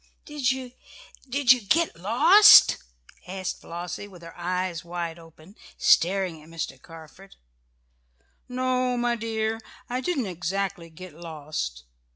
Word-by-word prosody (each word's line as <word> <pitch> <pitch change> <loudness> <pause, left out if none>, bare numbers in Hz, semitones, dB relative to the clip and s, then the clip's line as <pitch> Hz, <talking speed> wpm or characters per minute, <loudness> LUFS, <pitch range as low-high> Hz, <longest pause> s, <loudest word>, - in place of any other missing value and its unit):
"Did 290 -4 0
you 260 -1 -5 0.6
did 265 -1 +3
you 250 -2 +5
get 320 +12 +1
lost?" 245 - +7 0.5
asked 185 0 -5
Flossie, 175 +3 -7
with 180 -4 -15
her 165 - -11
eyes 180 -1 -3
wide 170 -1 -5
open, 165 +3 -17 0.2
staring 180 -2 +2
at 155 - -17
Mr. 155 -5 -6
Carford. 165 +4 -14 1.1
"No, 255 0 0
my 240 0 0
dear, 225 0 -3 0.3
I 250 +1 -1
didn't 285 -6 -1
exactly 180 -1 -4
get 180 +2 -12
lost. 150 - -6
185 Hz, 125 wpm, -25 LUFS, 165-245 Hz, 1.1 s, lost